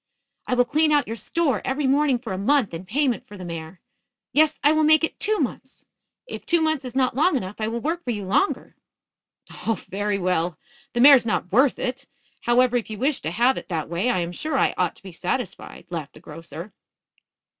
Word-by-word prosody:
"I 250 Hz, -, +1 dB
will 245 Hz, 0 st, +4 dB
clean 305 Hz, +4 st, +2 dB
out 295 Hz, -1 st, +3 dB
your 225 Hz, -, -5 dB
store 270 Hz, -, 0 dB
every 270 Hz, +2 st, -1 dB
morning 275 Hz, 0 st, +3 dB
for 235 Hz, -5 st, -6 dB
a -, -, -3 dB
month 240 Hz, -1 st, +2 dB
in 170 Hz, +3 st, -7 dB
payment 260 Hz, +2 st, 0 dB
for 205 Hz, -, -11 dB
the 185 Hz, -, -8 dB
mare. 165 Hz, +1 st, -7 dB, 0.5 s
Yes, 310 Hz, +1 st, +3 dB
I 295 Hz, -, +6 dB
will 310 Hz, 0 st, +3 dB
make 310 Hz, +1 st, +5 dB
it 320 Hz, -, -2 dB
two 430 Hz, +1 st, +1 dB
months. -, -, -4 dB, 0.4 s
If -, -, -7 dB
two 340 Hz, -, +2 dB
months 315 Hz, -3 st, 0 dB
is 250 Hz, -1 st, -7 dB
not 260 Hz, -3 st, +1 dB
long 300 Hz, +2 st, +3 dB
enough, 190 Hz, -3 st, -6 dB
I 215 Hz, -, -1 dB
will 235 Hz, +1 st, -3 dB
work 335 Hz, +5 st, -2 dB
for -, -, -6 dB
you 205 Hz, -4 st, -2 dB
longer." 390 Hz, -, 0 dB, 0.9 s
"Oh, 225 Hz, -, +1 dB
very 205 Hz, +1 st, -1 dB
well. 180 Hz, -3 st, 0 dB, 0.4 s
The 240 Hz, -, +1 dB
mare's 275 Hz, -1 st, +8 dB
not 210 Hz, -5 st, -2 dB
worth 260 Hz, +6 st, +4 dB
it. 260 Hz, +2 st, -4 dB, 0.4 s
However, 245 Hz, +1 st, +4 dB
if 230 Hz, -, -4 dB
you 215 Hz, -, -5 dB
wish 270 Hz, +5 st, 0 dB
to 155 Hz, -, -3 dB
have 240 Hz, +9 st, +2 dB
it -, -, -15 dB
that 160 Hz, -4 st, -3 dB
way 175 Hz, +8 st, 0 dB
I 210 Hz, -7 st, +1 dB
am 170 Hz, 0 st, -3 dB
sure 290 Hz, -, -2 dB
I -, -, +2 dB
ought 180 Hz, -2 st, 0 dB
to -, -, -19 dB
be 190 Hz, -, -9 dB
satisfied," 190 Hz, +4 st, -4 dB
laughed 160 Hz, -4 st, -5 dB
the -, -, -12 dB
grocer. 170 Hz, +3 st, -10 dB
240 Hz, 220 wpm, -23 LUFS, 185-285 Hz, 0.9 s, mare's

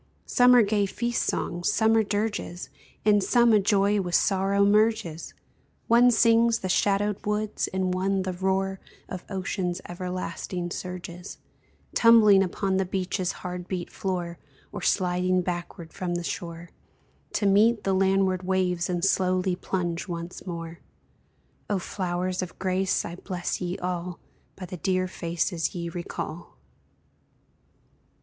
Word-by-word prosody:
Some 250 Hz, 0 st, +5 dB
are 240 Hz, -, +7 dB
gay 205 Hz, -1 st, +1 dB
feast 235 Hz, +4 st, -1 dB
songs, 175 Hz, 0 st, -1 dB
some 220 Hz, +1 st, +3 dB
are 225 Hz, -, +5 dB
dirges, 205 Hz, -4 st, -3 dB, 0.4 s
In 205 Hz, -1 st, +5 dB
some 235 Hz, +2 st, +4 dB
a 210 Hz, -, +6 dB
joy 200 Hz, 0 st, +2 dB
with 175 Hz, -2 st, -1 dB
sorrow 195 Hz, +1 st, +2 dB
merges; 205 Hz, -6 st, +1 dB, 0.5 s
One 240 Hz, +2 st, +6 dB
sings 230 Hz, 0 st, +4 dB
the 185 Hz, -, -3 dB
shadowed 200 Hz, +2 st, +1 dB
woods, 210 Hz, 0 st, -1 dB
and 185 Hz, -1 st, 0 dB
one 190 Hz, +1 st, 0 dB
the 185 Hz, -1 st, -3 dB
roar 190 Hz, +1 st, -1 dB, 0.3 s
Of 185 Hz, -, -7 dB
ocean's 185 Hz, -2 st, -2 dB
everlasting 180 Hz, 0 st, -4 dB
surges, 180 Hz, 0 st, -7 dB, 0.6 s
Tumbling 220 Hz, -4 st, +6 dB
upon 190 Hz, +1 st, 0 dB
the 190 Hz, -, +1 dB
beach's 185 Hz, 0 st, -2 dB
hard 180 Hz, 0 st, -5 dB
beat 180 Hz, -2 st, -4 dB
floor, 175 Hz, -3 st, -3 dB, 0.3 s
Or -, -, -6 dB
sliding 180 Hz, 0 st, +1 dB
backward 175 Hz, -2 st, -5 dB
from 175 Hz, -2 st, -3 dB
the 175 Hz, -, -3 dB
shore 170 Hz, 0 st, -6 dB, 0.6 s
To 205 Hz, -, 0 dB
meet 215 Hz, +4 st, +4 dB
the 195 Hz, -, +1 dB
landward 190 Hz, -1 st, +2 dB
waves 185 Hz, -2 st, 0 dB
and 175 Hz, 0 st, 0 dB
slowly 185 Hz, -1 st, +1 dB
plunge 175 Hz, -1 st, -3 dB
once 170 Hz, +1 st, -6 dB
more. 165 Hz, -1 st, -6 dB, 0.9 s
O 205 Hz, -, +1 dB
flowers 180 Hz, 0 st, -2 dB
of 180 Hz, -1 st, -6 dB
grace, 190 Hz, 0 st, 0 dB
I 170 Hz, -, -6 dB
bless 180 Hz, -1 st, -4 dB
ye 180 Hz, 0 st, -2 dB
all 180 Hz, -1 st, -4 dB, 0.4 s
By 185 Hz, -, -7 dB
the 180 Hz, 0 st, -7 dB
dear 185 Hz, +1 st, 0 dB
faces 170 Hz, -1 st, -2 dB
ye 170 Hz, -1 st, -3 dB
recall! 170 Hz, 0 st, -6 dB
185 Hz, 140 wpm, -26 LUFS, 175-200 Hz, 0.9 s, are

